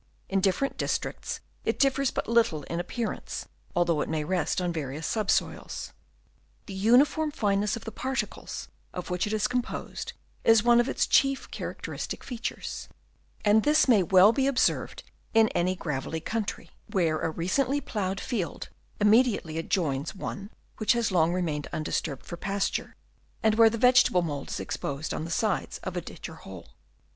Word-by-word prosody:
In 195 0 +1
different 200 +9 +1
districts - - -2 0.2
it - - 0
differs 275 -1 +3
but - - -3
little 225 -10 +2
in 170 +5 -4
appearance, 220 +5 -4 0.3
although 170 -3 +2
it - - -3
may 155 -1 -1
rest 180 +2 0
on 175 -1 -1
various 150 0 -4
subsoils. 215 +2 -1 0.7
The 195 - -8
uniform 250 +10 +4
fineness 205 -6 0
of 230 - -8
the 225 - -5
particles 265 +4 -4 0.3
of 180 0 -5
which 180 +3 0
it - - -3
is 215 -1 +2
com 250 0 +1
posed 245 - -6 0.3
is 225 -2 +6
one 240 0 +6
of 240 - +2
its - - +1
chief 275 -1 +2
characteristic - - -5
features; 240 -3 -5 0.6
and 210 +1 +6
this 300 +5 +4
may 240 -4 +6
be 175 - -2
well 190 +3 +7
observed 270 -2 +1 0.3
in 225 -1 +6
any 185 +2 0
gravelly 155 -2 -3
country, 215 +5 -4 0.2
where 165 -5 +1
a - - 0
recently 250 - 0
ploughed 195 -7 -3
field 205 -9 -3
B - - -3
2 - - -18
INTRODUCTION. 210 - -3
immediately 210 -8 +3
adjoins 160 -2 -1
one 200 +1 -6 0.3
which 215 +3 +3
has 235 -3 0
long 170 -2 +3
re 180 0 0
mained 150 -3 -2
undisturbed 155 -2 -3
for 170 - -7
pasture, 195 +2 -2 0.5
and 220 -1 +4
where 225 0 +7
the 230 - -3
vegetable 250 -7 +5
mould 145 -4 -4
is - - -3
exposed 140 +2 -3
on 155 - -3
the - - -6
sides 210 +3 0
of 190 - -4
a 175 - -1
ditch - - -8
or 160 - -10
hole. 90 - -11
195 Hz, 175 wpm, -28 LUFS, 170-230 Hz, 0.7 s, well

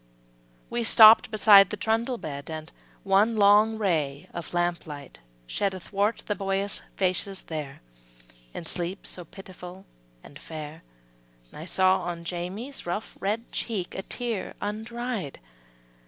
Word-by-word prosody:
'' - - -34
We 235 0 -1
stopped 220 -1 +8
beside 205 -3 +7
the 210 - -4
trundle 225 +4 0
bed 140 -7 -7
And 155 +1 -7 0.3
one 200 +4 +3
long 210 +2 +5
ray 155 -9 -1
of 170 -3 -7
lamp 175 -1 -1
light 145 -2 -9 0.3
shed 195 - -1
Athwart 200 +4 -1
the 210 - 0
boyish 195 0 -2
faces 190 +1 -1
there, 150 -4 -6 0.7
In 165 - -7
sleep 175 +3 -1
so 180 - -4
pitiful 185 +1 -11 0.4
and 145 - -13
fair; 155 0 -8 0.7
I 155 - -8
saw 185 +1 +3
on 170 -1 -5
Jamie's 185 +10 -5
rough, 205 +5 -4
red 215 +4 -2
cheek, 200 -6 -3
A - - -4
tear 230 -1 -4
undried. 220 - -4
190 Hz, 135 wpm, -26 LUFS, 170-215 Hz, 0.7 s, stopped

